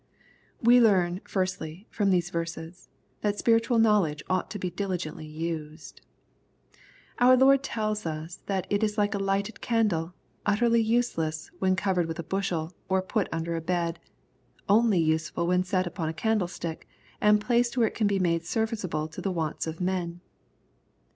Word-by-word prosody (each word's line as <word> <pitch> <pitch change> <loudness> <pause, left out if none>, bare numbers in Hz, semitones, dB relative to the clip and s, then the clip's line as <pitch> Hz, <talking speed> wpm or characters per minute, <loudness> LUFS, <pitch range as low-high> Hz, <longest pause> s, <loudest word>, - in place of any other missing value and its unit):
* - - -36
We 245 0 +8
learn, 185 -4 +3
firstly, 185 -1 -3
from 205 -3 +1
these 175 -1 +1
verses, 170 +1 -5 0.3
that 205 -1 0
spiritual 230 +2 +3
knowledge 205 -10 +3
oiight 185 0 -1
to 210 - -5
be 185 -2 -3
diligently 175 -4 -4
used. 155 0 -6 1.2
Our 255 +1 +7
Lord 270 +1 +6
tells 215 -5 -2
us 160 +3 -5
that 190 -2 -1
it 205 +1 +2
is 210 0 0
like 205 0 +2
a 200 - -1
lighted 195 +2 -1
candle, 185 -8 0 0.3
utterly 230 +3 +3
useless, 220 -9 -1
when 185 0 +2
covered 190 -3 0
with 165 0 -5
a 170 - -4
bushel, 175 -2 -2 0.2
or 190 0 +2
put 205 +1 -1
under 165 +1 -2
a 165 - -2
bed, 170 0 -1 0.4
— - - -40 0.3
only 215 0 +4
useful 160 +1 0
when 180 +1 +2
set 185 -1 0
upon 170 -2 -3
a - - -3
candlestick, 180 -7 -2 0.3
and 210 0 +5
placed 240 +2 +1
where 235 - +4
it - - -5
can 215 - +1
be 200 -1 +1
made 170 -3 +1
serviceable 185 -7 -2
to 160 - -8
the 195 - -1
wants 165 -2 -2
of 160 0 -5
men. 180 -2 -2
185 Hz, 165 wpm, -27 LUFS, 165-210 Hz, 1.2 s, We